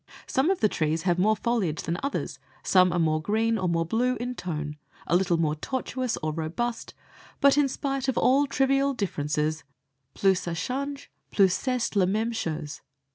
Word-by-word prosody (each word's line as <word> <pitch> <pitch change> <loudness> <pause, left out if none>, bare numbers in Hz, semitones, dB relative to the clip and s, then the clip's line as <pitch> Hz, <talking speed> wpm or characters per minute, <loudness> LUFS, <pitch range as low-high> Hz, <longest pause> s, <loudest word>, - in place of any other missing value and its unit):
Some 265 +6 +1
of 380 -6 0
the 215 - +5
trees 160 -3 -1
have 175 -1 +1
more 215 +4 +4
foliage 210 -10 -1
than 170 +1 -2
others, 280 0 -3 0.2
some 185 -1 +4
are 175 - -1
more 155 -2 +1
green 225 +4 +1
or 185 -1 0
more 165 0 +1
blue 245 +8 +1
in 245 +1 -4
tone, 150 -8 -5 0.3
a 170 - +1
little 180 -1 +2
more 155 -2 +1
tortuous, 255 - -3
or 155 0 -1
robust, 175 +10 -3 0.4
but 280 -1 +5
in 290 -1 +3
spite 270 0 -3
of 265 - 0
all 275 +3 +4
trivial 275 +1 +2
differences 155 -5 -1 0.5
plus 190 -2 +3
ça 170 - -2
change 275 - -4 0.2
plus 190 -3 +4
c'est 250 0 -1
la 195 -2 +4
même 220 +4 0
chose. 160 -7 -4
200 Hz, 180 wpm, -26 LUFS, 165-255 Hz, 0.5 s, the